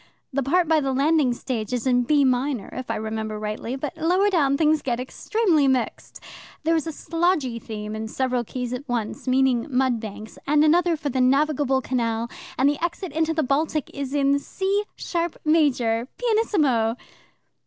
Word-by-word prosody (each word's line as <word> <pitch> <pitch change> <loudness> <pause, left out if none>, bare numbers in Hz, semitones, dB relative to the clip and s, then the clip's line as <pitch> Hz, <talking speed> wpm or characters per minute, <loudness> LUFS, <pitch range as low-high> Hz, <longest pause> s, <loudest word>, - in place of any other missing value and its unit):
The 275 - +1
part 335 +6 +2
by 320 0 +4
the 270 -1 -1
landing 285 0 +3
stage 235 -3 -4
is 245 -1 -2
in 250 -1 +3
B 290 +1 +4
minor, 255 -3 0
if 255 - -6
I - - 0
remember 220 0 -4
rightly, 215 +3 -4
but 275 +2 -5
lower 360 +6 +2
down 280 -6 +2
things 310 0 +3
get 240 -2 -2
extremely 320 - +1
mixed. 260 -2 -1 0.4
There 330 +1 +2
is 320 0 -1
a - - -2
slodgy 320 -7 -1
theme 210 -1 -6
in 220 0 -4
several 250 +1 -1
keys 250 +1 -5
at 260 +2 -6
once, 235 +1 -3
meaning 255 -1 +2
mud 255 -3 +1
banks, 215 0 -9
and 295 +1 +4
another 340 +1 +3
for 290 -1 -3
the 260 -1 0
navigable 275 0 +2
canal, 235 -2 -1 0.3
and 265 - +4
the 290 +3 0
exit 345 +1 -3
into 320 0 0
the 315 - +1
Baltic 295 +3 0
is 275 0 -4
in 280 0 +3
C 395 +6 -1
sharp 340 -1 -3
major, 250 -7 +2
pianissimo." 305 - +1
270 Hz, 175 wpm, -24 LUFS, 245-315 Hz, 0.4 s, by